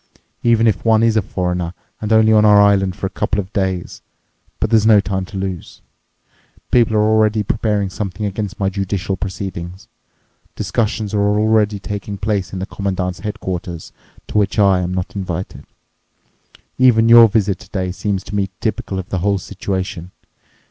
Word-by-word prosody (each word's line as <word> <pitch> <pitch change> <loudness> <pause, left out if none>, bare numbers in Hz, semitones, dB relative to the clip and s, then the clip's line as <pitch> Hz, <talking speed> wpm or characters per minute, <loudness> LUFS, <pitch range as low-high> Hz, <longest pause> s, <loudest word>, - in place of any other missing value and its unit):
Even 115 -1 +3
if 105 -5 +1
one 110 -1 +3
is 115 -1 +3
a 110 - +3
foreigner 90 -2 -3 0.3
and 105 0 -3
only 110 0 +5
on 105 -1 +5
our 105 -1 +6
island 100 -2 +3
for 95 - -5
a - - -1
couple 105 - -1
of 95 0 -5
days? 95 -3 -2 0.6
But 110 - -1
there's 110 -2 +4
no 110 -2 +7
time 95 -1 -2
to 95 - -9
lose. 95 -3 -6 0.9
People 115 -3 +3
are 105 - +3
already 110 -1 +2
preparing 105 -2 -1
something 105 0 -4
against 105 0 -4
my 95 - +1
judicial 95 -1 -2
proceedings. 95 -1 -6 0.7
Discussions 110 -2 -2
are 105 - +1 0.2
already 105 -1 +2
taking 100 0 -6
place 100 -2 -2
in 95 - -5
the 95 - -3
Commandant's 95 -2 -3
headquarters, 90 -5 -5 0.3
to 105 - 0
which 100 -1 0
I 100 -3 +4
am 90 0 -2
not 90 +1 -4
invited. 95 -2 -5 1.1
Even 115 -3 +5
your 115 0 +9
visit 100 -3 0
today 95 -2 -4
seems 95 0 -3
to 100 - -10
me 100 -1 0
typical 110 -3 -3
of 95 -1 -6
the 95 - -2
whole 100 +2 +1
situation. 95 -1 -4
100 Hz, 170 wpm, -18 LUFS, 95-110 Hz, 1.1 s, your